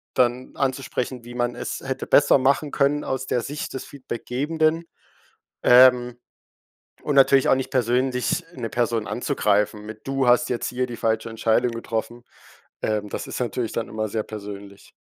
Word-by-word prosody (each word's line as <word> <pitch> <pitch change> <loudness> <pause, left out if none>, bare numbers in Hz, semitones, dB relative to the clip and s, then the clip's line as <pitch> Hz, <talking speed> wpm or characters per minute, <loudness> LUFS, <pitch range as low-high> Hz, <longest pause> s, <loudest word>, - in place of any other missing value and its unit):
dann 125 0 +1
anzusprechen, 130 -2 -2
wie 120 0 -10
man 120 0 -1
es - - -5
hätte 130 0 -4
besser 145 - +5
machen 140 +3 +1
können 145 +1 +1
aus 130 0 -3
der 120 - 0
Sicht 145 +5 -5
des 130 - -5
Feedbackgebenden. 150 +5 -2 0.8
Ähm, 125 -1 +6 0.8
und 145 - -1
natürlich 135 0 +5
auch - - +6
nicht 130 - -4
persönlich 125 0 +1
'ne 115 -6 -5
Person 115 -3 0
anzugreifen, 105 -3 0
mit: 110 +2 -10
„Du 135 -2 0
hast 120 0 +4
jetzt 120 - -1
hier 125 +1 -1
die 120 - -7
falsche 110 0 -1
Entscheidung 115 +2 +1
getroffen.“ 115 +1 -4 0.6
Ähm, 105 -1 -1
das - - -5
ist - - -6
natürlich 120 -1 -2
dann 115 - -3
immer 110 0 -3
sehr 110 +1 -2
persönlich. 100 -2 -9
125 Hz, 160 wpm, -23 LUFS, 115-130 Hz, 0.8 s, Ähm